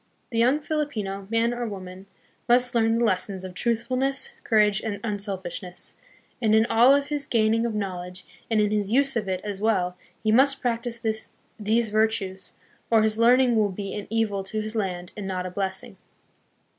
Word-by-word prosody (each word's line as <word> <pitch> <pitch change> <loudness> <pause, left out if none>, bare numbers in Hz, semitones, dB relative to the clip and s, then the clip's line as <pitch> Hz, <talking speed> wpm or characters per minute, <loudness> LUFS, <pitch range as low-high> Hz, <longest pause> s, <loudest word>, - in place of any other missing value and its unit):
The 230 - -1
young 255 +6 +4
Filipino, 215 -12 -3
man 230 +1 +1
or 240 -1 -3
woman, 190 -1 -8 0.4
must 245 +1 +4
learn 225 -1 +3
the 235 - +2
lessons 190 -1 0
of 185 -1 -7
truthfulness, 255 +6 0
courage, 210 -2 +3
and 205 -2 -4
unselfishness, 195 -4 -3 0.4
and 220 -2 +3
in 220 +1 +5
all 245 +5 +6
of 285 0 -1
his 290 -2 -1
gaining 225 0 +2
of 225 - -4
knowledge, 185 -2 -5 0.2
and 220 -2 +2
in 210 -1 +2
his 210 -1 0
use 275 +2 +3
of 215 -4 -1
it 185 -1 -2
as 205 -2 -5
well, 185 -5 +1 0.3
he 215 - +2
must 270 +4 +4
practice 235 -1 -3 0.5
these 220 +2 +1
virtues, 210 -3 0 0.3
or 225 -2 +4
his 220 0 +1
learning 245 +1 +5
will 215 -2 +3
be 195 +1 -5
an 205 -1 -5
evil 220 -3 0
to 215 +3 -3
his 215 +1 -3
land 180 -4 -3
and 205 -2 -5
not 185 -1 -3
a 185 - -5
blessing. 190 0 -3
215 Hz, 180 wpm, -25 LUFS, 195-235 Hz, 0.5 s, all